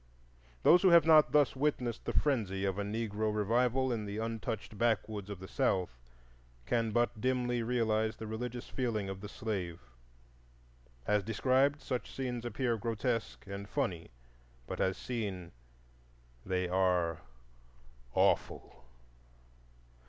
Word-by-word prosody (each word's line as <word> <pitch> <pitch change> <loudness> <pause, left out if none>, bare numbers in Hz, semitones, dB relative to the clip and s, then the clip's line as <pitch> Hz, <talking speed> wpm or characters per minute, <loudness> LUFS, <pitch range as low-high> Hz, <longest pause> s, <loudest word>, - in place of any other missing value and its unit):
Those 175 +1 +7
who 190 - +6
have 170 -3 +7
not 155 -2 +6
thus 145 -6 +4
witnessed 130 -5 -1
the - - -1
frenzy 105 -9 0
of 95 0 -1
a - - 0
Negro 110 0 -2
revival 120 +5 +1
in 110 -2 -2
the 100 +1 -5
untouched 110 -1 -4
backwoods 105 -2 0
of 100 - -5
the 95 - -8
South 90 -9 0 0.7
can 115 - +1
but 120 0 0
dimly 125 -1 +1
realize 110 -2 +1
the 110 - -7
religious 120 +2 -5
feeling 110 -6 -2
of 95 0 -6
the 105 - -7
slave; 95 -8 -4 1.3
as 105 +6 +2
described, 130 +7 +2
such 125 -2 -3
scenes 125 -3 -3
appear 120 0 0
grotesque 115 +1 -2
and 100 +1 -7
funny, 95 - -2 0.6
but - - -4
as 95 0 +1
seen 100 -8 -4 0.9
they 90 -1 -1
are 90 -2 +1 0.9
awful. - - +1
110 Hz, 130 wpm, -32 LUFS, 100-125 Hz, 1.3 s, Those